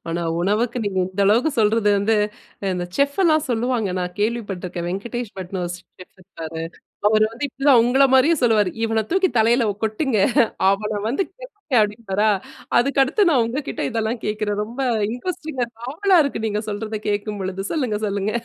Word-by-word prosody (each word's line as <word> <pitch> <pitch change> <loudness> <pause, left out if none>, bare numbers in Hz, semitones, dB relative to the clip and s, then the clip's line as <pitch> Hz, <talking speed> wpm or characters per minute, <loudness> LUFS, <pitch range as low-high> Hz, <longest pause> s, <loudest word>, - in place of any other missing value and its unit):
ஆனா 170 +1 -2 0.2
உணவுக்கு 220 +6 0
நீங்க 190 -2 -1
இந்த 190 +2 -5
அளவுக்கு 235 +10 +3
சொல்றது 215 0 +3
வந்து, 215 +3 +2 0.6
இந்த 180 -1 -2
செஃப்லாம் 310 +2 +2
சொல்லுவாங்க. 235 -2 0
நான் 180 0 -3
கேள்விப்பட்ருக்கேன். 195 -6 -3
'வெங்கடேஷ் 220 +5 -4
பட்னு' 185 0 -5
ஒரு 175 - -4
செஃப் 180 0 -17
இருப்பாரு. 165 -3 -7 0.5
அவரு 215 0 +4
வந்து 245 +5 -5
இப்டி 270 +2 -8
தான் 250 -4 +7
உங்கள 260 +3 +3
மாரியே 285 +6 +5
சொல்லுவாரு. 215 -5 +3
"இவன 225 -1 +1
தூக்கி 380 +1 +3
தலையில 235 +3 +4
ஒ 200 - -3
கொட்டுங்க. 220 +1 0 0.5
அவன 210 +1 -1
வந்து 275 +11 0
கேட்டு" 415 - -5
அப்டின்பாரா, 210 0 0 0.5
அதுக்கடுத்து 275 - +2
நான் 255 -6 +4
உங்ககிட்ட 270 +6 -4
இதெல்லாம் 225 +1 -2
கேட்குறேன். 210 -1 -1
ரொம்ப 235 +5 -8 0.3
இன்ட்ரஸ்டிங்கா 265 -1 -3 0.2
ஆவலா 370 +6 +3
இருக்கு 265 -5 -3
நீங்க 210 0 -1
சொல்றத 215 +1 -4
கேட்கும் 205 0 -2
பொழுது! 190 +1 -4
சொல்லுங்க, 250 -9 -1
சொல்லுங்க. 200 +1 -1
220 Hz, 155 wpm, -21 LUFS, 205-260 Hz, 0.6 s, தான்